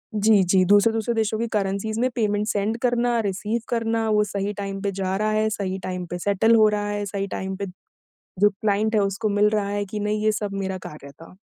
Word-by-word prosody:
जी, 210 -1 +4
जी, 185 +1 +3
दूसरे-दूसरे 220 +3 +3
देशों 220 -1 0
की 235 - -1
करेंसीज़ 205 +2 -1
में 255 - +2
पेमेंट 210 -2 0
सेंड 210 +2 0
करना, 240 -1 +1
रिसीव 210 +4 -2
करना, 230 -1 0
वो 210 0 +3
सही 200 0 -3
टाइम 195 -1 -4
पे 200 0 -1
जा 190 0 -1
रहा 215 +1 0
है, 215 0 +1
सही 195 -3 -3
टाइम 180 -1 -4
पे 175 - -2
सेटल 205 +4 +3
हो 215 -1 +6
रहा 205 0 -2
है, 205 0 -2
सही 200 0 -3
टाइम 190 0 -4
पे 200 +1 -4 0.7
जो 205 +1 +6
क्लाइंट 210 +2 0
है, 210 - +4
उसको 200 +2 -1
मिल 205 +1 +3
रहा 210 -2 0
है 205 0 -2
कि 210 +2 -5
नहीं? 210 +1 -1
ये 215 - +4
सब 210 -1 -3
मेरा 190 -1 -3
कार्य 140 -2 -11
था। 165 +5 -15
205 Hz, 225 wpm, -23 LUFS, 195-220 Hz, 0.7 s, हो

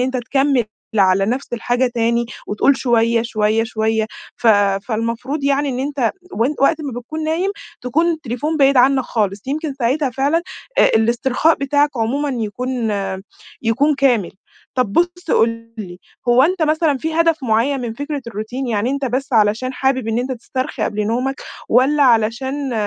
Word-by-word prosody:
أنت 260 +1 0
تكمل 270 0 +1 0.3
على 195 0 +4
نفس 250 +5 -3
الحاجة 245 +2 0
تاني 235 0 +1 0.2
وتقول 260 +6 +2
شوية، 230 -2 +2
شوية، 220 -1 +1
شوية، 220 -1 0 0.3
ف - - -3 0.4
فالمفروض 235 +5 -2
يعني 280 +1 +1
إن 255 - -3
أنت 270 -3 0 0.2
وأن 255 +3 0
وقت 275 +4 +4
ما 260 -5 -5
بتكون 310 +6 -6
نايم، 335 +5 0 0.3
تكون 290 +8 +1
التليفون 305 +1 -3
بعيد 275 -1 +4
عنك 265 +2 +5
خالص، 205 -3 -2
يمكن 295 +1 -3
ساعتها 270 +2 0
فعلًا 280 +7 +1 0.4
أ - - +7
الإسترخاء 245 +7 +2
بتاعك 285 +1 +1
عمومًا 260 +6 0
يكون 240 0 -2 0.7
يكون 275 +7 +2
كامل. 250 -9 +2 0.4
طب 250 -6 0
بُص 350 - 0
قُل 230 0 +1
لي، 180 -4 -7 0.3
هو 240 +2 +6
أنت 350 +3 +1
مثلًا 310 -2 +2
في 320 +4 -3
هدف 330 0 +3
مُعيّن 250 +4 +1
من 235 -2 -4
فكرة 285 +2 -4
الروتين؟ 235 +4 -5
يعني 225 +2 0
أنت 280 0 -2
بس 265 +2 -2
علشان 220 +3 +2
حابب 260 -3 0
إن 225 +1 0
أنت 255 +2 -2
تسترخي 255 +3 -4
قبل 210 0 -1
نومك 255 +5 -1 0.3
والّا 270 +5 +4
علشان 260 +3 +1
255 Hz, 155 wpm, -19 LUFS, 230-280 Hz, 0.7 s, أ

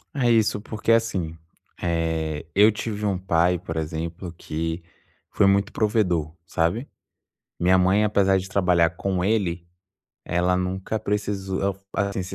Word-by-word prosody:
É 125 -3 +2
isso, 110 -2 +3
porque 110 +1 -2
assim, 100 -8 +1 0.5
eh, 80 -3 -1
eu 105 +3 +6
tive 105 0 -4
um 100 -3 +1
pai, 90 -1 +2
por 80 -1 -6
exemplo, 80 +3 -4
que 80 +2 -4 0.5
foi 100 - +3
muito 100 +2 +2
provedor, 90 -8 +1
sabe. 85 - -1 0.7
Minha 90 +2 +4
mãe, 95 +3 +3
apesar 100 -2 +3
de 95 - -4
trabalhar 90 -3 +3
com 90 0 -2
ele, 90 -5 0 0.6
ela 90 +1 +1
nunca 95 +4 -2
precisou 100 -2 -2
al 100 -1 -1 0.3
assim, 100 -1 -3
se 95 +1 -7
95 Hz, 140 wpm, -24 LUFS, 85-105 Hz, 0.7 s, eu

